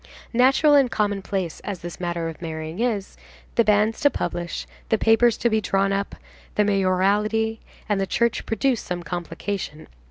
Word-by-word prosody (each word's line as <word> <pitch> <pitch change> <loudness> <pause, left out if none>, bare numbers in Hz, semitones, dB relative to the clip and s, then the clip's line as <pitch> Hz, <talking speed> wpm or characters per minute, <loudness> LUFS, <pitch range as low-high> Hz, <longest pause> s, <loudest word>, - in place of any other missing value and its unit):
Natural 265 +5 +5
and 275 -3 +5
commonplace 195 -5 -2
as 200 -4 -6
this 175 0 -7
matter 170 -2 -2
of 165 0 -8
marrying 160 +1 -5
is, 225 -5 -1 0.4
the 235 - +4
banns 210 +1 +2
to 285 - +5
publish, 175 -7 -3 0.2
the 220 - +3
papers 225 +1 +4
to - - +1
be 220 -1 +2
drawn 195 0 +1
up, 200 0 -2 0.4
the 210 - +3
mayoralty, 205 +3 +1 0.3
and 205 -2 +1
the 195 - -1
church 235 +3 0
produce 245 +1 +1
some 175 -1 -4
complication. 170 0 -5
200 Hz, 160 wpm, -23 LUFS, 175-225 Hz, 0.4 s, Natural